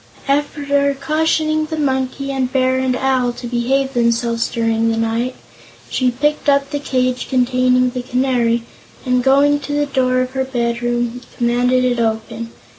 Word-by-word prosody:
After 280 0 +1
cautioning 310 0 +1
the 315 - -4
Monkey 275 -1 -1
and 260 -2 -1
Bear 260 0 +2
and 260 -1 0
Owl 255 -2 +1
to 245 - -9
behave 260 +3 0
themselves 235 -1 +1
during 225 -1 0
the 225 - 0
night, 230 +3 -1 0.6
she 255 -1 +2
picked 295 +4 0
up 280 0 +2
the 290 - -2
cage 255 -2 -1
containing 255 0 +2
the 250 0 -4
Canary 245 -2 0 0.4
and, 250 -1 +1
going 280 +2 +4
to 290 0 -5
the 290 0 +1
door 255 -2 +1
of 255 0 -3
her 265 0 -1
bedroom, 240 -1 -2 0.2
commanded 250 +1 +2
it 245 -1 +1
to 225 -1 +2
open. 230 +1 -8
255 Hz, 160 wpm, -18 LUFS, 240-275 Hz, 0.6 s, going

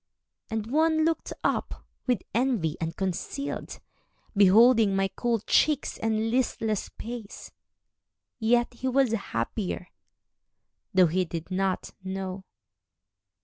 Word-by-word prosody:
And 220 -1 -2
one 315 +5 +2
looked 330 0 -1
up, - - -1 0.2
with 245 -7 +1
envy 225 - +1
unconcealed, 190 +11 -3 0.6
Beholding 210 +1 +6
my 195 0 +1
cool 235 -3 0
cheeks 295 +5 +2
and 225 0 0
listless 225 -4 0
pace, 230 -2 -8 0.9
Yet 240 +2 +2
he 250 +2 -4
was 260 -2 +3
happier, 180 - -3 1.0
though 185 -1 +6
he 180 +3 +1
did 170 0 -6
not 190 0 -1
know. 190 0 -5
220 Hz, 105 wpm, -27 LUFS, 190-245 Hz, 1.0 s, Beholding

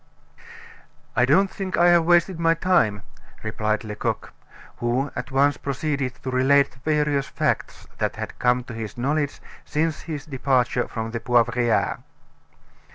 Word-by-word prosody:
"I - - +4
don't 195 0 +3
think 190 -1 -4
I 175 +1 +5
have 170 -1 +5
wasted 175 +1 +3
my 165 0 +3
time," 165 - +2 0.4
replied 110 0 -1
Lecoq, 105 -1 -4 0.4
who 125 +4 -1
at 130 - -5
once 140 +1 +2
proceeded 140 -2 -2
to 130 - -3
relate 140 +2 +4
the 130 - -20
various 150 -1 0
facts - - -2
that - - -1
had - - -7
come 125 0 +2
to 120 - -9
his 110 -1 -6
knowledge 145 +3 -1 0.2
since 155 +1 -1
his 150 -3 -6
departure 130 -3 0
from 110 0 -5
the 115 - -3
Poivriere. 120 -1 +1
135 Hz, 145 wpm, -23 LUFS, 120-155 Hz, 0.4 s, I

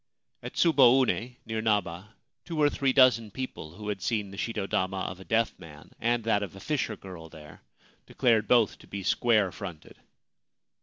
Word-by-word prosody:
At - - -7
Tsuboune, 130 -5 +3
near 110 -1 -3
Naba, 105 -1 -1 0.3
two 165 -3 -5
or 145 -1 +4
three 135 -1 +1
dozen 130 -4 +4
people 100 -9 -7
who 105 +2 -7
had 100 -2 -3
seen 105 -3 -2
the 100 - -10
shito 105 -3 -3
dama 95 0 -1
of 90 0 -5
a - - -10
deaf 115 +3 +1
man 75 -4 -13
and 120 0 0
that 110 -2 +1
of 100 -2 -6
a - - -10
fisher 125 -1 -2
girl 90 -4 -11
there 75 -2 -14 0.5
declared 115 -5 +2
both 115 -3 +3
to - - -17
be 100 -1 -6
square 110 -2 +2
fronted. 90 -4 -9
105 Hz, 175 wpm, -28 LUFS, 95-120 Hz, 0.5 s, or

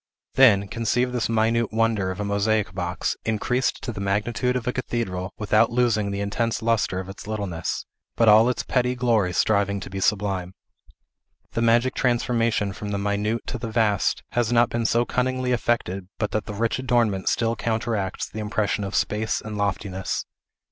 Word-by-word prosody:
Then, 110 -7 +5
conceive 115 +4 0
this 120 -3 -1
minute 115 0 +1
wonder 110 -4 +1
of 95 - -5
a 105 - -2
mosaic 100 +1 0
box, 90 +1 -2
increased 125 +4 0
to - - -3
the 100 - -6
magnitude 110 +6 0
of 125 -2 -2
a 125 - -1
cathedral, 105 -7 -3
without 105 +2 +3
losing 115 -4 +2
the 100 0 -3
intense 110 +3 -1
lustre 115 -5 +1
of 95 - -6
its 95 +1 -10
littleness, 100 -6 -3 0.3
but 115 - +3
all 110 +3 +7
its 125 - -1
petty 125 0 0
glory 115 -7 +2
striving 100 +2 +1
to 95 - -9
be 95 - -4
sublime. 95 -2 0 1.0
The 115 - -2
magic 120 +2 +3
transformation 115 -4 +1
from 105 +2 -6
the 100 - -1
minute 105 +3 -1
to 125 - -4
the 115 0 -4
vast 110 -4 +1
has 120 -1 0
not 120 0 +4
been 115 -1 0
so 120 +1 +2
cunningly 130 0 -1
effected 105 -6 -1
but 105 -3 -2
that 110 - -1
the 105 - -5
rich 115 +4 0
adornment 120 -7 +1
still 115 0 +1
counteracts 110 -4 -2
the 110 - -8
impression 105 -1 -1
of 100 0 -4
space 110 +1 0
and 110 -1 -7
loftiness. 100 -2 -2
110 Hz, 175 wpm, -24 LUFS, 100-120 Hz, 1.0 s, all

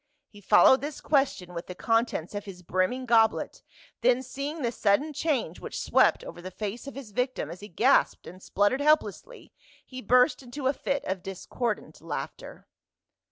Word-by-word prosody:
he 205 - -15
followed 215 +6 +6
this 290 +1 -5
question 270 - 0
with 170 +1 -6
the 180 - -7
contents 225 -6 0
of 205 0 -5
his 180 -3 -10
brimming 185 +9 -1
goblet, 225 -2 +2 0.4
then 250 +1 +3
seeing 280 +4 -5
the 235 - 0
sudden 235 +8 +1
change 290 -3 -1
which - - -6
swept - - +3
over 175 - -9
the 185 - -7
face 210 +6 -6
of 275 - -8
his 265 -6 -9
victim 250 +4 -2
as 175 - -9
he 205 - -9
gasped 240 +9 +2
and 185 +2 -11
spluttered 205 +9 +1
help 305 +1 +5
lessly - - -11 0.3
he 255 -1 -8
burst 250 +7 +3
into 260 +2 -8
a 265 - +3
fit 275 +1 -2
of 190 -1 -3
discordant 205 +4 -4
laughter. - - -7
240 Hz, 175 wpm, -27 LUFS, 195-270 Hz, 0.4 s, followed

